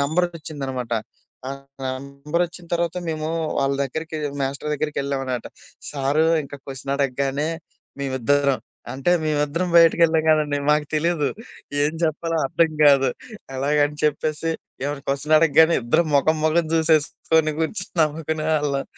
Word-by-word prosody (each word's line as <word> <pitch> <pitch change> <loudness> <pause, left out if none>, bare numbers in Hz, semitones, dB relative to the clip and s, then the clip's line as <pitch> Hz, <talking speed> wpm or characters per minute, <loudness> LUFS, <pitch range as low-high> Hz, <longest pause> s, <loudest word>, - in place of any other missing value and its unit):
నెంబరొచ్చిందనమాట. 145 -6 -2 0.6
ఆ - - -3 0.3
నెంబరొచ్చిన 140 +7 -3
తర్వాత 170 0 -1
మేము 155 -1 -2 0.3
వాళ్ళ 135 0 +1
దగ్గరికి 160 +4 -5 0.2
మాస్టర్ 140 +2 -2
దగ్గరికెళ్ళాం 140 -2 -2
అనమాట. 125 -2 -3 0.4
సారు 140 +2 +1 0.2
ఇంకా 145 0 -9
క్వెషన్ 135 0 -5
అడగగానే 140 +2 0 0.5
మేమిద్దరం 140 0 +1 0.3
అంటే 135 +6 0
మేమిద్దరం 150 +3 0
బయటికెళ్ళాం 165 -1 +5
కదండీ, 150 -2 +3
మాకు 150 0 +2
తెలీదు 155 -2 +1 0.5
ఏం 150 +1 +1
చెప్పాలో, 165 +1 0
అర్థం 165 +3 +2
కాదు. 135 -2 +6 0.5
అలాగని 145 +2 +1
చెప్పేసి 150 +2 0 0.3
ఏవైనా 145 0 -3
క్వెషన్ 140 +3 +1
అడగగానే 160 +1 +5
ఇద్దరు 140 +8 +3
మొఖం 155 +3 +3
మొఖం 160 +1 +2
చూసేసుకొని 160 0 +2
కూర్చొని 180 +4 -3
నవ్వుకునేవాళ్ళం. 155 -2 0
150 Hz, 115 wpm, -22 LUFS, 140-160 Hz, 0.6 s, కాదు